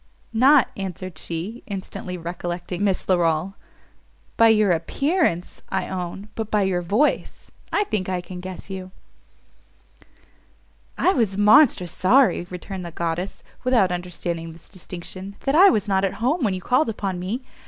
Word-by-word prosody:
"Not," 260 Hz, +3 st, +5 dB
answered 185 Hz, -3 st, -6 dB
she, 180 Hz, +9 st, -5 dB
instantly 185 Hz, -2 st, -6 dB
recollecting 175 Hz, +2 st, -4 dB
Miss 195 Hz, -2 st, +1 dB
Larolles, 175 Hz, 0 st, +1 dB, 0.8 s
"by 230 Hz, -, +6 dB
your 215 Hz, -3 st, +4 dB
appearance, 185 Hz, -, 0 dB
I 190 Hz, -, -2 dB
own! 190 Hz, +2 st, -5 dB
but 220 Hz, -2 st, -4 dB
by 210 Hz, -2 st, +2 dB
your 185 Hz, -2 st, 0 dB
voice, 210 Hz, -, 0 dB, 0.2 s
I 415 Hz, -, +2 dB
think 205 Hz, -, -2 dB
I 185 Hz, -1 st, -1 dB
can 180 Hz, 0 st, -8 dB
guess 185 Hz, 0 st, -8 dB
you." 190 Hz, -1 st, -6 dB, 2.1 s
"I 375 Hz, -, +3 dB
was 215 Hz, -7 st, 0 dB
monstrous 205 Hz, -, +5 dB
sorry," 230 Hz, -3 st, +3 dB
returned 185 Hz, +1 st, -6 dB
the 170 Hz, -, -5 dB
goddess, 170 Hz, +2 st, -3 dB, 0.2 s
without 240 Hz, -8 st, +3 dB
understanding 175 Hz, -2 st, -4 dB
this 165 Hz, -, -14 dB
distinction, 185 Hz, +1 st, -7 dB
"that 275 Hz, -, 0 dB
I 375 Hz, +6 st, +8 dB
was 215 Hz, -, +1 dB
not 190 Hz, -1 st, +2 dB
at 195 Hz, -, 0 dB
home 265 Hz, +8 st, 0 dB
when 200 Hz, -5 st, +1 dB
you 185 Hz, -, -5 dB
called 255 Hz, -, +2 dB
upon 195 Hz, -4 st, -3 dB
me. 210 Hz, +9 st, -3 dB
190 Hz, 150 wpm, -23 LUFS, 175-220 Hz, 2.1 s, I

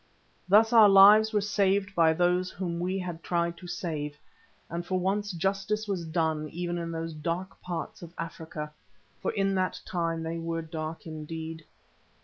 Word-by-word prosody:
Thus 220 Hz, +4 st, +6 dB
our 220 Hz, -3 st, +9 dB
lives 205 Hz, +3 st, +8 dB
were 210 Hz, -2 st, +2 dB
saved 200 Hz, -1 st, +1 dB
by 165 Hz, -3 st, +5 dB
those 180 Hz, +2 st, +2 dB
whom 175 Hz, -3 st, -4 dB
we 185 Hz, +2 st, -1 dB
had 175 Hz, -3 st, -5 dB
tried 170 Hz, 0 st, 0 dB
to 180 Hz, -, -10 dB
save, 150 Hz, -4 st, -4 dB, 0.5 s
and 170 Hz, +1 st, -4 dB
for 185 Hz, +1 st, -1 dB
once 205 Hz, +3 st, 0 dB
justice 195 Hz, +4 st, -1 dB
was 185 Hz, -4 st, -2 dB
done 160 Hz, -2 st, 0 dB
even 175 Hz, +1 st, -3 dB
in 170 Hz, 0 st, -4 dB
those 165 Hz, 0 st, -4 dB
dark 170 Hz, +5 st, -4 dB
parts 175 Hz, -2 st, -5 dB
of 170 Hz, -2 st, -9 dB
Africa, 160 Hz, -2 st, -6 dB, 0.5 s
for -, -, 0 dB
in 195 Hz, -1 st, +1 dB
that 185 Hz, -1 st, 0 dB
time 165 Hz, -2 st, -2 dB
they 165 Hz, +1 st, -3 dB
were 165 Hz, 0 st, -3 dB
dark 160 Hz, 0 st, -6 dB
indeed. 160 Hz, 0 st, -6 dB
175 Hz, 165 wpm, -28 LUFS, 165-195 Hz, 0.5 s, our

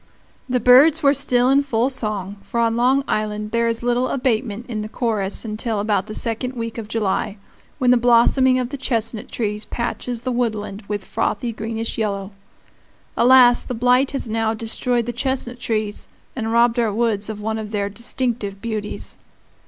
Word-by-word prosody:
The 250 Hz, 0 st, +1 dB
birds 280 Hz, +7 st, +6 dB
were 280 Hz, 0 st, +5 dB
still 250 Hz, -3 st, +2 dB
in 275 Hz, +1 st, +5 dB
full 245 Hz, -3 st, 0 dB
song, 210 Hz, -6 st, -3 dB
for 235 Hz, -, -4 dB
on 230 Hz, -1 st, +2 dB
Long 255 Hz, +3 st, +3 dB
Island 210 Hz, 0 st, -2 dB
there 235 Hz, 0 st, +1 dB
is 230 Hz, 0 st, -1 dB
little 245 Hz, +1 st, +1 dB
abatement 240 Hz, -4 st, -1 dB
in 220 Hz, -4 st, -3 dB
the 215 Hz, -, -6 dB
chorus 215 Hz, -4 st, -1 dB
until 215 Hz, 0 st, -3 dB
about 205 Hz, -1 st, 0 dB
the 215 Hz, -, -5 dB
second 240 Hz, +3 st, -1 dB
week 230 Hz, -1 st, -4 dB
of 220 Hz, -, -7 dB
July, 210 Hz, -1 st, -1 dB, 0.4 s
when 250 Hz, -1 st, +3 dB
the 250 Hz, -, +6 dB
blossoming 245 Hz, +2 st, +4 dB
of 250 Hz, -1 st, -1 dB
the 280 Hz, -, -5 dB
chestnut 230 Hz, -4 st, -2 dB
trees 210 Hz, -2 st, -2 dB
patches 235 Hz, +1 st, -4 dB
the 255 Hz, -, -1 dB
woodland 220 Hz, -4 st, -2 dB
with 205 Hz, -2 st, -4 dB
frothy 235 Hz, +3 st, -1 dB
greenish 225 Hz, +1 st, -4 dB
yellow.[*] 200 Hz, -2 st, -2 dB, 0.5 s
[*] -, -, -35 dB
Alas! 245 Hz, -1 st, +6 dB
the 250 Hz, -, -5 dB
blight 250 Hz, +3 st, +3 dB
has 275 Hz, -4 st, -2 dB
now 225 Hz, 0 st, 0 dB
destroyed 235 Hz, +2 st, -1 dB
the 240 Hz, -, -3 dB
chestnut 250 Hz, -1 st, -2 dB
trees, 215 Hz, -3 st, -2 dB, 0.3 s
and 225 Hz, -3 st, -2 dB
robbed 235 Hz, +1 st, +3 dB
our 230 Hz, -3 st, +1 dB
woods 215 Hz, -1 st, 0 dB
of 215 Hz, -1 st, -5 dB
one 220 Hz, +1 st, -2 dB
of 215 Hz, -1 st, -6 dB
their 205 Hz, -2 st, -1 dB
distinctive 230 Hz, -1 st, -3 dB
beauties. 215 Hz, -1 st, -5 dB
230 Hz, 180 wpm, -21 LUFS, 215-245 Hz, 0.5 s, birds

